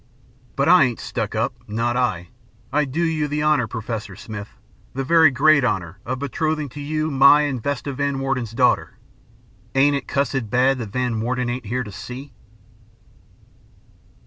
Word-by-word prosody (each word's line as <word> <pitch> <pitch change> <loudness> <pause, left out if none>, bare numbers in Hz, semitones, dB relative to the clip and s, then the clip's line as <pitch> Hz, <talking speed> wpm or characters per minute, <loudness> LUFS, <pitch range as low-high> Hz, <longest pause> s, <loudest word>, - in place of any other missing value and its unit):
But 140 - +1
I 175 -4 +7
ain't 120 -2 -3
stuck - - -4
up - - 0
not 115 +3 -1
I. 105 -9 -1 0.4
I 150 +1 +2
do 145 +6 -2
you 160 -3 0
the 150 +1 -2
honor, 150 -6 +2
Professor 110 -3 -5
Smith, 105 -1 -8 0.5
the 135 - -1
very 160 +2 +6
great 145 +2 +4
honor 95 -6 -2
of 130 +1 -2
betrothing 150 +2 -2
to 145 +4 -9
you 155 +2 -2
my 140 +2 +6
and 140 -5 -2
Vesta 140 +2 -3
Van 140 +1 -1
Warden's 130 -4 -2
daughter. 125 +1 +1 0.8
Ain't 140 +2 +4
it 140 - -4
cussed 135 -4 -1
bad 130 +3 +2
that 115 -3 -5
Van 125 -2 -1
Warden 125 +1 -1
ain't 125 -2 -5
here 125 +4 -1
to 105 - -9
see?'" 125 +6 -9
130 Hz, 165 wpm, -22 LUFS, 120-145 Hz, 0.8 s, I